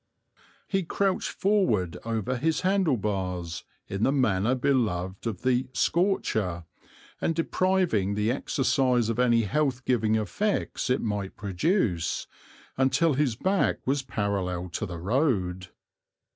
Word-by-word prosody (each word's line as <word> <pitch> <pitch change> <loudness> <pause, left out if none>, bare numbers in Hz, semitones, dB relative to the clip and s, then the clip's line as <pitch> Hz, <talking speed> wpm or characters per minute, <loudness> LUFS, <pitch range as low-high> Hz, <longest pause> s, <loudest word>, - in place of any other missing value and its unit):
He 195 -1 +1
crouched 190 +2 0
forward 185 - +1
over 115 +2 -2
his 160 +5 0
handle 185 -7 +2
bars, 90 -5 -3 0.2
in 100 +1 -4
the 135 - +3
manner 120 -4 +2
beloved 110 -8 0
of 110 -3 -4
the 130 0 +2
"scorcher" 110 - 0 0.6
and 165 - 0
depriving 165 - +1
the 105 +2 +1
exercise 130 -3 +1
of 115 +1 -1
any 120 -2 +4
health 130 +3 0
giving 110 -3 +2
effects 200 - -1
it 125 - +2
might 105 -3 -3
produce, 100 - 0 0.5
until 140 +5 +3
his 135 -4 +1
back 190 - +1
was 135 +2 +1
parallel 95 -7 -2
to 105 +5 -3
the 85 -1 -6
road. 95 - 0
120 Hz, 125 wpm, -27 LUFS, 100-145 Hz, 0.6 s, any